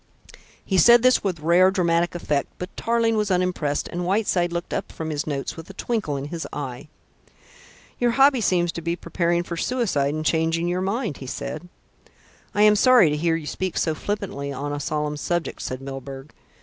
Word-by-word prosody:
He 190 -2 +2
said 235 +7 +7
this 255 0 +4
with 180 -6 -2
rare 175 +4 +5
dramatic 175 -2 +1
effect; 150 -4 -1
but 180 +2 -7
Tarling 230 -1 +1
was 210 -1 0
unimpressed, 180 -6 0
and 175 +1 -4
Whiteside 180 -2 +1
looked 170 0 -4
up - - -3
from 160 -1 -5
his 150 0 -3
notes 140 -2 -3
with 165 +2 -10
a 195 - -10
twinkle 205 -11 -2
in 140 +2 -5
his 165 0 -5
eye. 135 -2 -6 1.1
"You 245 - +3
hobby 270 +1 +4
seems 175 -4 +2
to 170 - -6
be 170 +1 -1
preparing 175 -1 -1
for 175 - -5
suicide 160 - 0
and 155 0 -4
changing 165 +2 +1
your 180 +1 -1
mind," 200 - -2
he 130 - -9
said. 155 +6 -6 0.9
"I 205 - +4
am 210 0 +6
sorry 240 - +6
to - - 0
hear 165 +2 +1
you 165 -2 -5
speak 185 +4 -3
so 160 - +1
flippantly 165 -6 -4
on 145 +2 -4
a 145 - -3
solemn 150 +1 -2
subject," 175 +2 -2
said 130 0 -5
Milburgh. 135 +1 -8
170 Hz, 190 wpm, -23 LUFS, 150-195 Hz, 1.1 s, said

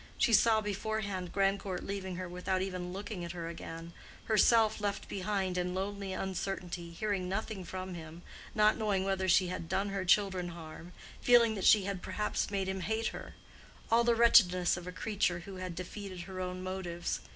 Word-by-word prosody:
She 235 - +3
saw 220 +1 +5
beforehand 205 -3 -3
Grandcourt 195 -1 0
leaving 190 -2 -4
her 185 0 -4
without 180 +1 -1
even 180 -2 -4
looking 195 -1 -5
at 170 - -5
her 170 -2 -5
again—herself 210 +7 +1
left 205 -1 -2
behind 190 -2 -1
in 180 0 -2
lonely 195 0 -3
uncertainty—hearing 185 0 -3
nothing 195 0 -3
from 185 +1 -6
him—not 175 +6 -1
knowing 205 -4 +1
whether 190 -1 0
she 180 0 +4
had 170 -2 -5
done 200 +1 0
her 195 -1 -2
children 185 -1 +3
harm—feeling 175 +8 +1
that 195 -3 -3
she 210 -2 +7
had 195 -1 -3
perhaps 210 +3 -2
made 195 -2 -1
him 190 0 -2
hate 220 +4 -1
her;—all 230 +1 -3
the 235 0 +3
wretchedness 185 -6 +5
of 175 0 -8
a - - -4
creature 180 -3 -1
who 190 +2 -9
had 185 -2 -5
defeated 185 +1 -6
her 185 +1 -7
own 185 0 -4
motives. 185 -2 -3
190 Hz, 160 wpm, -32 LUFS, 180-205 Hz, -, she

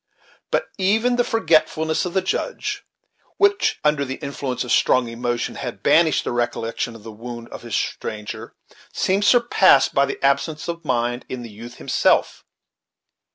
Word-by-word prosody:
But - - 0
even 220 +6 +2
the 245 - +4
forgetfulness 160 -6 +1
of 180 - -5
the 190 - +2
Judge, - - -3 0.5
which, 405 0 +2
under 150 -1 +2
the 135 -1 -4
influence 140 -4 -4
of 125 - -5
strong 130 -2 +3
emotion, 120 +1 -2
had - - -6
banished 160 -1 +4
the - - -3
recollection 120 -1 -2
of 110 - -13
the 115 - -8
wound 115 +2 -8
of - - -9
this - - -4
stranger, 105 -1 -4 0.4
seemed 195 +2 +1
surpassed 220 - +5
by 140 0 +3
the - - -4
absence 140 +4 0
of 170 0 -4
mind 120 -3 -1
in 125 -1 -5
the 115 - -9
youth 120 +3 -10
himself. - - +1
140 Hz, 155 wpm, -22 LUFS, 120-180 Hz, 0.5 s, surpassed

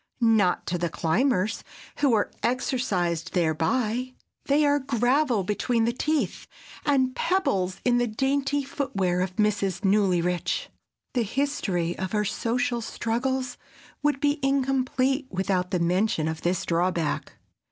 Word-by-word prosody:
Not 220 -6 +3
to 175 0 -2
the 170 0 0
climbers 210 - 0 0.3
who 280 -3 +3
are 210 -2 +1
exercised 205 - -1
thereby. 215 - 0 0.3
They 295 +2 +3
are 290 0 +3
gravel 250 -2 +1
between 225 +4 0
the 235 - +1
teeth, 305 +4 -1 0.4
and 260 -3 +2
pebbles 195 - 0
in 245 -1 +4
the 245 - +1
dainty 275 +5 0
foot 275 -1 -4
wear 180 -2 +1
of 185 0 -2
Mrs. 200 -3 0
Newlyrich. 180 -3 +1 0.4
The 245 - +1
history 205 - -1
of 190 +1 -3
her 210 0 +1
social 235 +3 -1
struggles 250 +3 -2 0.4
would 295 -2 +1
be 290 +1 +1
incomplete 270 0 +1
without 185 -1 -1
the 185 - 0
mention 180 0 +1
of 160 0 -3
this 175 +1 0
drawback. 170 -2 0
225 Hz, 130 wpm, -26 LUFS, 185-265 Hz, 0.4 s, in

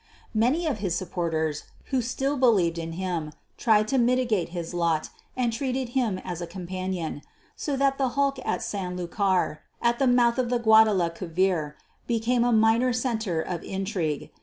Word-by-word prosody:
Many 250 +10 +2
of 280 -9 -1
his 190 -4 -1
supporters, 165 -4 -2 0.3
who 260 -2 +2
still 270 +4 -1
believed 200 -11 +3
in 165 0 -5
him, 170 -4 -3 0.2
tried 215 -2 +3
to 270 -1 +2
mitigate 240 -6 +2
his 170 -1 -5
lot 170 -3 0 0.3
and 240 -2 +1
treated 255 0 -2
him 240 -6 0
as 175 -1 -4
a 170 - -4
companion; 185 -3 -4 0.3
so 290 - -2
that 275 0 +2
the 265 -2 +2
hulk 275 -1 +2
at - - -1
San 180 -3 -4
Lucar, 180 -2 0 0.2
at 235 0 +1
the 270 - +3
mouth 245 0 +4
of 245 -2 0
the 245 - +2
Guadalquiver 185 -7 +2 0.3
became 235 +1 +1
a 245 - +2
minor 225 +3 +4
centre 220 -9 -1
of 175 -2 -4
intrigue. 190 -6 -3
210 Hz, 160 wpm, -26 LUFS, 175-245 Hz, 0.3 s, mouth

